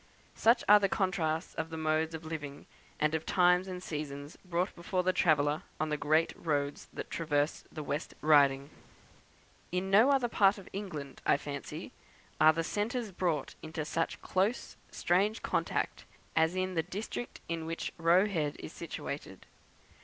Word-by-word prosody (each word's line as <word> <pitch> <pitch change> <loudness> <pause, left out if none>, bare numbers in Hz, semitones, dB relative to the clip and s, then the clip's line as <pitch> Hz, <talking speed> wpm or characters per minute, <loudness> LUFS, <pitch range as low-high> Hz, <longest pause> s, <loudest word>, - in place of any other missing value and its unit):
Such 230 +3 +4
are 210 +1 +9
the 195 -1 +1
contrasts 175 -4 0
of 160 0 -3
modes 160 0 0
of 160 0 -8
living, 150 -3 -6 0.3
and 150 +1 +2
of 160 0 0
times 180 +1 +3
and 180 -1 -6
seasons, 145 -2 -5
brought 180 0 -1
before 180 +2 -1
the 185 +1 +2
traveller 150 -3 +3 0.2
on 155 - 0
the 150 - +1
great 155 +2 +2
roads 145 -3 -2
that - - -7
traverse 150 -2 0
the 155 - -6
West 145 +2 -4
Riding. 140 -2 +4 1.0
In 185 +2 -1
no 220 +7 +7
other 270 -3 +3
part 205 -2 +4
of 195 - -11
England, 155 -9 -6
I - - +4
fancy, 140 -1 -6 0.5
are 155 0 +8
the 165 +1 -1
centuries 215 +4 -2
brought 170 -5 -1
into 160 -1 -5
such 165 +1 -1
close, 195 +6 0
strange 200 +5 +1
contact - - -1 0.3
as 160 +2 +3
in 185 0 -1
the 165 - +2
district 205 +7 -6
in 165 -1 -3
which 165 0 -4
Roe 170 +4 +5
Head 160 -8 -1
is - - -8
situated. - - -6
165 Hz, 160 wpm, -31 LUFS, 155-185 Hz, 1.0 s, are